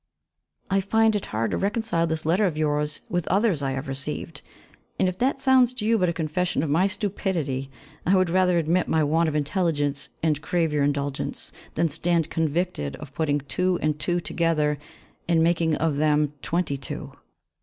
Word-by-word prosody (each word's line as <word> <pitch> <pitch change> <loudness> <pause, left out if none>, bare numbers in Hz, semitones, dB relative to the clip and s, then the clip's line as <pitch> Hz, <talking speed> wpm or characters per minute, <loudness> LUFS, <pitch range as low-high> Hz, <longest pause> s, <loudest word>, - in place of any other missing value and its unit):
I 195 0 +3
find 220 +2 +3
it 205 - -2
hard 110 0 -1
to - - 0
reconcile 200 -4 0
this 160 -1 -3
letter 185 +6 +3
of 160 -4 -3
yours 150 -1 0
with 175 -1 -2
others 195 -4 +2
I 135 -1 -1
have 135 +2 -4
received, 135 +1 -5 0.6
and - - +3
if 185 0 -3
that 270 +2 +1
sounds 260 -2 +4
to 215 - -4
you 225 0 +3
but 180 -2 +2
a - - -1
confession 165 0 -1
of 150 - -1
my 175 +6 +4
stupidity, 185 -9 -2 0.3
I 185 - +3
would 185 -2 +2
rather 180 -1 +3
admit 170 +2 +1
my 160 -1 +2
want 160 +2 +2
of 150 - -4
intelligence 150 -2 0
and 155 -2 +1
crave 165 -3 0
your 145 -1 +2
indulgence, 140 -1 -2 0.2
than 165 - +2
stand 165 +1 0
convicted 160 - -1
of 145 -2 -11
putting 145 -2 0
two 180 +6 0
and 150 -1 0
two 175 +3 0
together 155 -4 0 0.5
and 165 -1 +3
making 165 -1 +2
of 155 -2 0
them 150 -1 +2
twenty 170 -5 -1
two. 135 - -7
165 Hz, 185 wpm, -25 LUFS, 150-185 Hz, 0.6 s, sounds